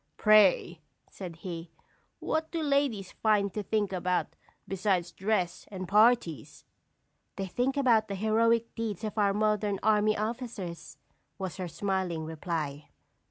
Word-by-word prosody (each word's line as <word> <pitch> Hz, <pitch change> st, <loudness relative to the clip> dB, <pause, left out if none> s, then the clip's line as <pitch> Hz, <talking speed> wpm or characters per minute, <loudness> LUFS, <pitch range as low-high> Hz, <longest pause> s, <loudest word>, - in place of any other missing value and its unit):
"Pray," 200 Hz, -5 st, +4 dB, 0.3 s
said 180 Hz, -4 st, -8 dB
he, 165 Hz, -1 st, -7 dB, 0.5 s
"what 315 Hz, 0 st, -1 dB
do 330 Hz, -2 st, -3 dB
ladies 280 Hz, -9 st, 0 dB
find 205 Hz, -3 st, +1 dB
to 210 Hz, -, -2 dB
think 205 Hz, 0 st, -1 dB
about 180 Hz, 0 st, -1 dB, 0.3 s
besides 190 Hz, -2 st, 0 dB
dress 190 Hz, -3 st, -1 dB
and 185 Hz, -2 st, -6 dB
parties?" 210 Hz, -, +2 dB, 0.7 s
"They 195 Hz, -, -3 dB
can 245 Hz, +8 st, 0 dB
think -, -, -9 dB
of 220 Hz, -3 st, +4 dB
the 200 Hz, -, -4 dB
heroic 230 Hz, +3 st, +2 dB
deeds 220 Hz, -3 st, -4 dB
of 215 Hz, -, -3 dB
our 200 Hz, -1 st, +4 dB
modern 210 Hz, -2 st, +1 dB
army 215 Hz, 0 st, +3 dB
officers," 215 Hz, -, -5 dB, 0.4 s
was 190 Hz, -3 st, -5 dB
her 185 Hz, -2 st, -3 dB
smiling 185 Hz, -3 st, -2 dB
reply. 155 Hz, -2 st, -4 dB
200 Hz, 135 wpm, -29 LUFS, 180-220 Hz, 0.7 s, Pray